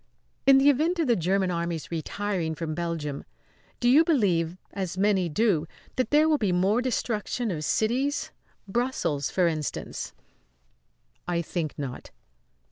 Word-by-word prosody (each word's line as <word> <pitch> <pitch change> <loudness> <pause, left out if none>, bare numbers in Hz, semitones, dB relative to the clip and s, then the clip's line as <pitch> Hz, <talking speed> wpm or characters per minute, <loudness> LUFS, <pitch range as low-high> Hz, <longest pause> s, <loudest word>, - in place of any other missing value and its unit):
"In 275 -1 +8
the 280 +2 +6
event 320 +6 +1
of 330 - +1
the 240 -3 +3
German 185 +1 +1
Army's 170 -2 -3
retiring 170 0 -2
from 155 0 -4
Belgium, 160 -4 -3 0.6
do 240 - +1
you 280 +6 +7
believe, 185 - +1 0.2
as 185 -3 -4
many 190 -3 +2
do, 170 -2 +1 0.3
that 255 - 0
there 300 +2 +5
will 305 -2 +3
be 205 -4 +1
more 190 +6 +2
destruction 240 -2 -1
of 155 -3 -3
cities? 255 - 0 0.4
Brussels, 195 - -1
for 185 - +2
instance?" 155 -3 -3 1.1
"I 170 -1 0
think 160 -2 -3
not." 135 -4 -6
190 Hz, 140 wpm, -27 LUFS, 165-245 Hz, 1.1 s, In